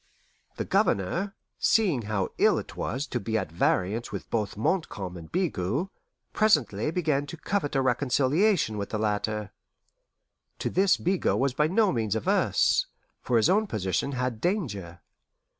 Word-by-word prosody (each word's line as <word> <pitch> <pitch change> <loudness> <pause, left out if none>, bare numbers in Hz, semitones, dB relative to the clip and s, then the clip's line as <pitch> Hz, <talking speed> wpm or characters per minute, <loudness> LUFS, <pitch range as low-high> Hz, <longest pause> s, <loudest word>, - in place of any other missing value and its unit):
The - - -3
Governor, 175 - 0 0.2
seeing 185 - +3
how 105 -3 -2
ill - - +4
it - - -6
was 135 +3 -2
to 125 - -3
be 110 -1 -1
at 80 - -3
variance 95 +7 0
with 100 - -7
both 105 -3 -1
Montcalm 105 - -1
and 80 -2 -10
Bigot, 150 - -1 0.4
presently 150 - +2
began 155 -4 0
to 170 - -7
covet 170 -4 -2
a 135 - +2
reconciliation 135 - +2
with 100 - -4
the 110 - -2
latter. 105 0 -1 1.1
To - - -3
this 190 +2 +3
Bigot 185 +1 +1
was 135 -1 +1
by 150 +3 +2
no 200 +4 +3
means 110 -4 -1
averse, 110 - +2 0.3
for 120 - +1
his 110 - +4
own 210 +3 +3
position 105 - -1
had 125 -3 -2
danger. 105 - -2
125 Hz, 150 wpm, -27 LUFS, 105-175 Hz, 1.1 s, ill